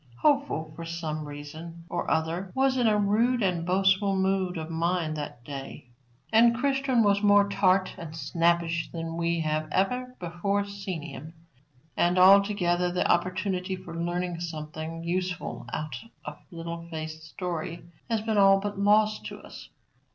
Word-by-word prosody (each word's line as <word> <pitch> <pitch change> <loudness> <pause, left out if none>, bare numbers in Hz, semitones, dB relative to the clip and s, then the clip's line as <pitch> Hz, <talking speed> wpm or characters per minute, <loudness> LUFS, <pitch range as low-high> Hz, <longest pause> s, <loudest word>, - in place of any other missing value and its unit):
Hopeful, 275 - +1
for 170 - -7
some 160 -2 -4
reason 155 +4 -9
or 175 - -3
other, 165 +4 -1
was 265 0 +3
in 245 -3 +2
a 210 -1 +4
rude 220 +4 +2
and 180 -3 +1
boastful 190 +1 +3
mood 190 -1 0
of 160 -1 -4
mind 165 -1 0
that 145 -5 -6
day, 135 -1 -8 0.4
and 235 +1 +6
Christian 270 -2 +2
was 200 -1 +3
more 205 -1 +5
tart 190 -1 +2
and 160 -2 -7
snappish 170 +2 +1
than 165 -1 -5
we 170 0 0
have 155 0 -1
ever 250 +8 0
before 190 +4 -1
seen 200 -5 -5
him; 160 0 -9 0.6
and, 175 +1 +2
altogether, 185 -2 +5
the 180 - +1
opportunity 185 +1 0
of 185 0 -13
learning 175 +1 -3
something 160 0 -6
useful 180 +1 -3
out 155 -5 -4 0.3
of 150 0 -7
Little 170 0 -6
Faith's 160 -1 -6
story 170 -1 -5 0.3
has 225 -2 +1
been 220 -1 +1
all 195 0 +6
but 205 0 -4
lost 215 +1 +3
to - - -8
us. - - -12
180 Hz, 150 wpm, -27 LUFS, 165-200 Hz, 0.6 s, and